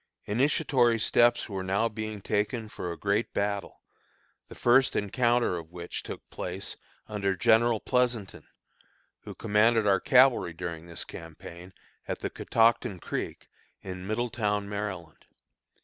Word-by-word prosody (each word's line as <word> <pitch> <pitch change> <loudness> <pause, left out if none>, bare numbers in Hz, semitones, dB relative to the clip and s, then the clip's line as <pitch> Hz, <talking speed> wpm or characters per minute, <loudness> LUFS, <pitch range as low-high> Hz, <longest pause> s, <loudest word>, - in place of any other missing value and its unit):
Initiatory 125 0 +2
steps 120 +2 +3
were 95 -3 -4
now 100 +4 +1
being 110 -2 -5
taken 110 +2 -1
for 90 -4 -5
a 85 - -6
great 105 +3 -1
battle, 100 -1 -2 0.6
the - - -12
first 130 +2 +4
encounter 120 -1 +1
of 80 -1 -11
which 85 0 -6
took - - -9
place, - - -5 0.3
under 100 -2 -1
General 115 +3 +4
Pleasonton, 120 -6 -1 0.8
who - - -8
commanded 110 +1 +3
our 100 -2 +4
cavalry 130 - +4
during 85 -1 -6
this 85 0 -5
campaign, 85 +2 -10 0.4
at - - -4
the - - -3
Catoctin 115 -2 +2
Creek, - - -5 0.3
in 95 0 -7
Middletown, 110 -2 -1
Maryland. 100 -6 -6
105 Hz, 130 wpm, -28 LUFS, 95-120 Hz, 0.8 s, first